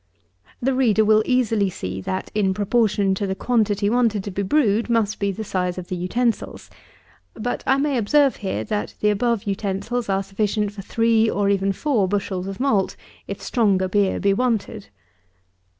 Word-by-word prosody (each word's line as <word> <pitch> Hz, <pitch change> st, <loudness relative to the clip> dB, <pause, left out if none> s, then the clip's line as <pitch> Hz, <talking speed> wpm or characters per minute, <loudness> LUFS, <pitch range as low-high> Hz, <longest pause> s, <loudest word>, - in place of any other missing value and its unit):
61. -, -, -4 dB
The 270 Hz, -, +2 dB
reader 225 Hz, -5 st, +3 dB
will 215 Hz, 0 st, +5 dB
easily 225 Hz, -6 st, +2 dB
see, 95 Hz, -, -5 dB
that, 185 Hz, -, -4 dB
in 195 Hz, -3 st, +1 dB
proportion 205 Hz, -1 st, +1 dB
to 200 Hz, +1 st, -2 dB
the 190 Hz, -, -2 dB
quantity 210 Hz, -3 st, +1 dB
wanted 225 Hz, -3 st, +1 dB
to 200 Hz, -, -5 dB
be 195 Hz, -, -3 dB
brewed 225 Hz, 0 st, +1 dB
must 225 Hz, -3 st, +1 dB
be 200 Hz, -1 st, 0 dB
the 220 Hz, +3 st, -5 dB
size 180 Hz, -3 st, -2 dB
of 180 Hz, 0 st, -7 dB
the 185 Hz, -, -2 dB
utensils; 225 Hz, +7 st, -2 dB, 0.6 s
but, 240 Hz, +2 st, -3 dB
I 265 Hz, -, +4 dB
may 280 Hz, -1 st, 0 dB
observe 275 Hz, +5 st, +3 dB
here, 190 Hz, -, -3 dB
that 210 Hz, -, -3 dB
the 210 Hz, -, +3 dB
above 230 Hz, +1 st, 0 dB
utensils 200 Hz, +4 st, -3 dB
are 195 Hz, 0 st, +1 dB
sufficient 205 Hz, +1 st, -1 dB
for 205 Hz, -1 st, -8 dB
three, 225 Hz, +2 st, +2 dB
or 200 Hz, -1 st, 0 dB
even 195 Hz, 0 st, +1 dB
four, 220 Hz, -2 st, 0 dB
bushels 190 Hz, -1 st, -2 dB
of 195 Hz, -1 st, -6 dB
malt, 220 Hz, -8 st, +1 dB, 0.3 s
if -, -, -5 dB
stronger 200 Hz, -6 st, +1 dB
beer 195 Hz, 0 st, +1 dB
be 200 Hz, 0 st, +2 dB
wanted. 220 Hz, -, -1 dB
205 Hz, 180 wpm, -22 LUFS, 195-230 Hz, 0.6 s, will